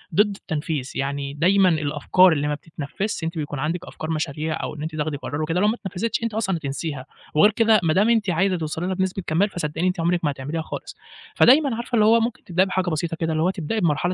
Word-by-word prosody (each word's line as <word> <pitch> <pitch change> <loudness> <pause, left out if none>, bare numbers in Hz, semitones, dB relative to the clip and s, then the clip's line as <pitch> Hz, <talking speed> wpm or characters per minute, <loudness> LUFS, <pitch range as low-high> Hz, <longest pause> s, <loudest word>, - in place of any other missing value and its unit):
ضد 205 +1 +3
التنفيذ، 150 -6 -4
يعني 140 0 -3
دايمًا 185 +5 +4
الأفكار 155 +4 +3
اللي 145 -1 -1
ما 150 - 0
بتتنفذش، 160 +5 -5
أنتِ 165 +1 -3
بيكون 145 -2 -4
عندِك 165 +5 -2
أفكار 155 - -7
مشاريع 155 0 -2
أو - - -4
إن 150 - -8
أنتِ 155 0 -5
تاخدي 150 -1 -2
قرار 145 +2 -4
وكده، 165 +3 0
لو 210 - +3
ما 220 - +2
اتنفذتش 220 +2 -3
أنتِ 230 -2 -2
أصلًا 195 -5 0
هتنسيها، 140 -2 -4 0.3
وغير 205 +8 +5
كده 220 -1 +4
ما 155 -1 +2
دام 210 +4 +3
أنتِ 220 -5 +2
عايزة 185 +2 +1
توصلي 160 +2 -3
لها 190 - -1
بنسبة 190 0 -2
كمال، 185 +6 +2
فصدقيني 160 0 -2
أنتِ 180 -1 -1
عمرِك 170 +1 +1
ما 145 - +2
هتعمليها 145 +4 -4
خالص، - - -7 0.4
فدايمًا 270 -1 +5
عارفة 240 +1 -3
اللي 210 -1 +4
هو 230 +1 +6
ممكن 230 0 -2
تبدئي 180 +1 +2
بحاجة 185 -1 -1
بسيطة 165 +1 -2
كده، 165 -1 0
اللي 155 +1 +1
هو 180 - +3
تبدئي 190 +3 -2
بمرحلة 170 0 +1
170 Hz, 230 wpm, -23 LUFS, 155-195 Hz, 0.4 s, هو